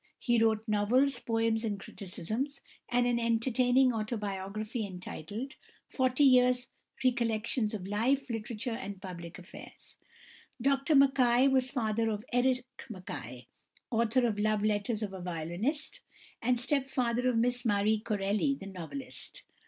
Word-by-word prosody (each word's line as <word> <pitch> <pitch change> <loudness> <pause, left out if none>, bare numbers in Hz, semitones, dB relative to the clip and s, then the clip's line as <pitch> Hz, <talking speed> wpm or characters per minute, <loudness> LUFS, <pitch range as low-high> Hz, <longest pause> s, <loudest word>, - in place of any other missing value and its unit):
He 240 -2 +2
wrote 220 0 +1
novels, 235 +6 +3
poems, 225 -1 0
and 205 -3 -2
criticisms, 215 - -4 0.3
and 245 0 +2
an 240 -1 +2
entertaining 245 +2 +3
autobiography 215 0 -3
entitled 200 - -6 0.3
"Forty 255 +1 +2
Years' 250 -1 +5 0.4
Recollections 230 -2 +1
of 190 -3 -6
Life, 250 +7 +1
Literature, 230 0 -3
and 200 -3 -5
Public 175 -3 -8
Affairs." 180 +1 -12 0.6
Dr 275 +4 +2
Mackay 265 -2 +5
was 260 -1 +2
father 225 -3 0
of 215 +1 -3
Eric 250 0 +2 0.2
Mackay, 125 - -7 0.5
author 235 +2 +2
of 215 -3 0
"Love 215 0 +1
Letters 215 +1 0
of 200 -2 -4
a 190 - -7
Violinist," 180 - -2 0.4
and 245 +1 +2
stepfather 255 -2 +1
of 240 - +1
Miss 245 +1 +1
Marie 210 -1 +2
Corelli 210 +5 0
the 195 - -10
novelist. 195 - -7
230 Hz, 130 wpm, -31 LUFS, 205-255 Hz, 0.6 s, Years